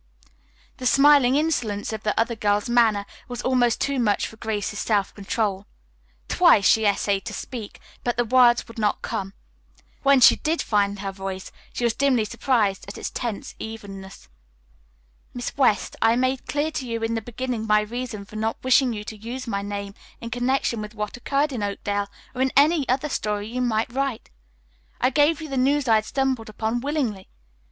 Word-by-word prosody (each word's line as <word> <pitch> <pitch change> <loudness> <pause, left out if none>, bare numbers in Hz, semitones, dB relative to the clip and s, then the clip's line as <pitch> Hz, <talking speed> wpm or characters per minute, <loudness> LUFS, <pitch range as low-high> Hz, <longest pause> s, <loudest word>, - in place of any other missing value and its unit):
The 255 - -1
smiling 275 -1 +5
insolence 240 -10 -1
of 215 - -5
the 215 0 -1
other 230 +1 +1
girl's 205 0 +1
manner 225 -4 +3 0.2
was 245 -1 -6
almost 245 -2 +2
too 280 -1 0
much 210 -4 +1
for - - -8
Grace's 210 -2 -3
self 205 -3 0
control. 200 -1 -2 0.6
Twice 200 - +5
she 220 +1 +5
essayed 200 -1 +1
to 215 -3 -5
speak, 225 -2 -7 0.2
but 240 -1 -1
the 240 - +2
words 245 0 +4
would 230 -1 -10
not 210 -1 0
come. 195 0 -4 0.7
When 275 -1 +5
she 250 - +7
did 325 +1 -1
find 200 -2 0
her 195 -1 -3
voice 190 -1 -6 0.2
she - - -4
was 235 -1 +2
dimly 255 -4 +2
surprised 215 -4 0
at - - -8
its - - -5
tense 235 -5 -4
evenness. 195 - -9 1.1
"Miss 245 0 -4
West, 255 -7 +2
I 225 +1 +4
made 255 +1 0
clear 295 +2 -1
to 260 -4 -4
you 230 -1 -3
in 225 0 0
the 225 - -1
beginning 240 0 -4
my 210 0 +4
reason 225 -1 -5
for 215 - -10
not 220 +1 -1
wishing 260 -1 +4
you 210 -1 -5
to 215 - -7
use 235 +5 -6
my 200 -4 -2
name 200 0 -5 0.3
in 230 - -7
connection 245 -2 0
with 210 +1 -8
what 210 -1 -4
occurred 280 +4 0
in 235 - -3
Oakdale 205 0 -2 0.2
or 255 - -3
in 265 0 +2
any 295 0 +4
other 260 +4 +1
story 210 -6 -2
you 250 +2 -3
might 235 -1 0
write. 270 -3 -2 0.7
I 255 - +2
gave 295 +3 +3
you 315 - -6
the 270 -2 -4
news 275 +2 +2
I 225 - +5
had 215 -1 +3
stumbled 265 -4 -1
upon 220 +2 -2
willingly. 255 -8 -2
230 Hz, 185 wpm, -24 LUFS, 210-255 Hz, 1.1 s, she